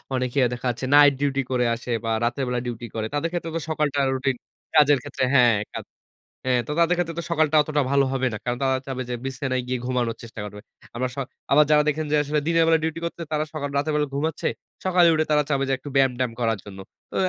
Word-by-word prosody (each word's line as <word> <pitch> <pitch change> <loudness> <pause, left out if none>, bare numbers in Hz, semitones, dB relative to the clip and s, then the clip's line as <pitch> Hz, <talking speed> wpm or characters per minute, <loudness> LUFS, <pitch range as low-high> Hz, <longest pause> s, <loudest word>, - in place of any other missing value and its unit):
অনেকে 130 +1 -1
দেখাচ্ছে 125 +1 -3
night 145 -1 +8
duty 140 -1 +1
করে 125 -1 +2
আসে 120 +1 -7
বা 115 - -2
রাতের 120 +3 0
বেলা 125 0 -1
ডিউটি 120 -1 -5
করে। 110 -1 -2
তাদের 145 +3 0
ক্ষেত্রে 170 -2 -3
তো - - -1
সকালটা 150 -2 0
রুটিন 130 0 0 0.4
কাজের 145 -1 +6
ক্ষেত্রে - - -3
হ্যাঁ 120 -4 +6 0.9
হ্যাঁ 125 -1 +2
তো - - -3
তাদের 170 +1 +4
ক্ষেত্রে 165 -2 -2
তো - - -3
সকালটা 155 -2 +2
অতটা 150 0 0
ভালো 140 -1 +4
হবে 130 -1 +1
না। - - -3
কারণ 120 0 -2
তারা 130 -1 +2
চাবে 130 -1 -3
যে 125 - -2
বিছানায় 130 -1 -2
গিয়ে 125 0 -1
ঘুমানোর 125 -2 -1
চেষ্টা 115 -1 -10
করবে। 105 0 -9 0.4
আবার 130 +1 -1
স - - -23 0.3
আবার 150 +2 +7
যারা 150 0 +5
দেখেন 155 +1 0
যে - - +3
আসলে 150 +1 0
দিনের 165 0 +4
বেলা 165 0 +4
ডিউটি 160 +1 -2
করছে 170 - -5
তারা 155 0 0
সকাল 145 -2 -3
রাতের 150 +2 0
বেলা 150 0 +1
ঘুমাচ্ছে। 155 +2 -1 0.4
সকালে 180 -2 +5
উঠে 155 0 +1
তারা 150 0 +4
চাবে 135 -1 +1
যে - - +2
একটু 145 +2 -9
ব্যায়াম-ট্যায়াম 130 -3 +2
করার 115 -2 +1
জন্য। 100 -2 -10 0.3
তো - - -8
140 Hz, 220 wpm, -24 LUFS, 125-150 Hz, 0.9 s, night